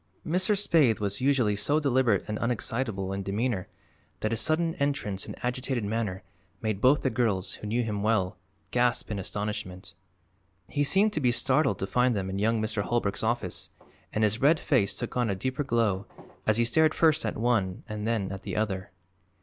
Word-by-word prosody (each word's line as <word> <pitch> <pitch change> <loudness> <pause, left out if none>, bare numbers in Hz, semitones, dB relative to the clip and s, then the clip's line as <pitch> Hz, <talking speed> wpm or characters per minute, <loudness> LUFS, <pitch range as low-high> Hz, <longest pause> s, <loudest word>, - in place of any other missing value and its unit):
Mr. 185 +5 +2
Spaythe 155 - +3
was 100 +1 -1
usually 130 -6 +2
so 145 +9 +2
deliberate 130 -8 +2
and 105 0 -3
unexcitable 115 -4 -1
in 100 - -3
demeanor 100 0 -2 0.5
that 110 - 0
his 115 - +1
sudden 165 +1 +2
entrance 140 -9 -1
and - - -6
agitated 125 -1 -1
manner 105 -3 -2 0.4
made 110 -3 -2
both 135 +3 +5
the 130 - +1
girls, 110 -6 +1
who 105 - -7
knew 120 +3 0
him 105 -3 -3
well, 100 -4 +1 0.4
gasp 125 -2 +1
in 105 - -2
astonishment. 95 -2 -5 0.7
He 145 - 0
seemed 200 +8 +3
to - - +1
be 125 -2 +3
startled 135 +3 +2
to - - -2
find 125 +4 +2
them 95 -1 -2
in 95 - -3
young 110 +2 +2
Mr. 110 -1 -1
Holbrook's 105 -2 -1
office 120 +2 -2 0.4
and 110 - 0
his 105 +2 +1
red 150 +4 +5
face 115 -9 +1
took 120 - -5
on 120 -2 +1
a 100 - 0
deeper 130 +9 -2
glow 110 -7 0 0.4
as 110 0 +3
he 120 - +3
stared 155 +6 +3
first 160 -1 +3
at 110 - -2
one 110 -5 0
and 105 -1 -4
then 110 -5 -1
at 95 0 -6
the - - -5
other. 100 -3 -2
115 Hz, 190 wpm, -28 LUFS, 100-130 Hz, 0.7 s, both